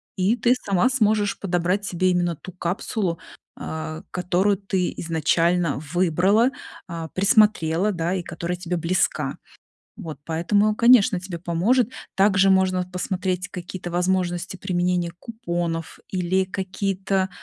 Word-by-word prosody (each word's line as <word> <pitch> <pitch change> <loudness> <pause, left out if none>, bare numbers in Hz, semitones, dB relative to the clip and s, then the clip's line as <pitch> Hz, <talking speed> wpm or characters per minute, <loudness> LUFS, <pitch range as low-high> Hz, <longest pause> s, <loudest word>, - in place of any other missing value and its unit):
и 190 +5 +2
ты 245 +1 +3
сама 200 +4 +3
сможешь 215 -5 +1
подобрать 180 +1 0
себе 185 0 +1
именно 175 -1 0
ту 175 +5 -10
капсулу, 180 0 -2 0.4
а, 160 +1 -5
которую 185 +3 +1
ты 190 -2 -1
изначально 165 -1 +1
выбрала, 185 - +3 0.4
а, 165 -1 -5
присмотрела, 200 -2 +3
да, 170 -1 -1
и 190 - -1
которая 170 +1 -4
тебе 180 0 -3
близка. 170 +3 0 0.6
Вот 165 -8 -7
поэтому, 205 +7 +1
конечно, 235 -4 +5
тебе 180 -1 -6
поможет. 200 +9 +1 0.2
Также 195 0 +4
можно 185 -1 +3
посмотреть 185 0 -2
какие-то 180 -1 -7
возможности 180 0 -1
применения 180 -2 0
купонов 175 -8 -4
или 185 +1 0
какие-то, 190 0 -2
185 Hz, 120 wpm, -23 LUFS, 175-195 Hz, 0.6 s, конечно